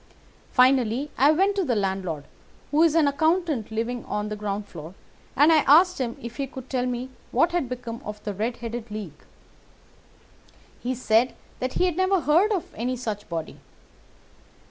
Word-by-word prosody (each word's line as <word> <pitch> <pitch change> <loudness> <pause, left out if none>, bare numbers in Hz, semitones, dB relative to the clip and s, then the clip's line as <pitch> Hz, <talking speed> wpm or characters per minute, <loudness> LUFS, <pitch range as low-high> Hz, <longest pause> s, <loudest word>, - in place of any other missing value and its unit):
Finally, 255 +1 +3
I 280 +3 +5
went 385 +6 +3
to 390 - +2
the 255 -8 0
landlord, 190 -7 -2 0.5
who 300 +2 +3
is 330 -2 +4
an 320 -3 +4
accountant 315 - +1
living 230 +2 -3
on 210 0 -3
the 210 - -3
ground 205 0 -3
floor, 165 +1 -10 0.4
and 295 +5 +6
I - - +6
asked 350 +5 +6
him 235 -2 -3
if 235 0 -8
he 275 -1 -2
could 260 -1 -10
tell 255 -1 0
me 250 +1 -4 0.2
what 330 +8 +3
had 340 -8 -1
become 240 -2 -6
of 210 0 -7
the 205 - -3
Red 225 +5 -2
headed 230 0 -5
League. 205 -8 -7 1.6
He 255 +1 -2
said 235 0 +2 0.2
that 255 0 -2
he 365 - +2
had 355 -2 -1
never 375 0 +2
heard 340 +9 +3
of 380 -5 -2
any 245 +3 -2
such 215 -4 -5
body. 165 -2 -5
250 Hz, 175 wpm, -25 LUFS, 215-300 Hz, 1.6 s, and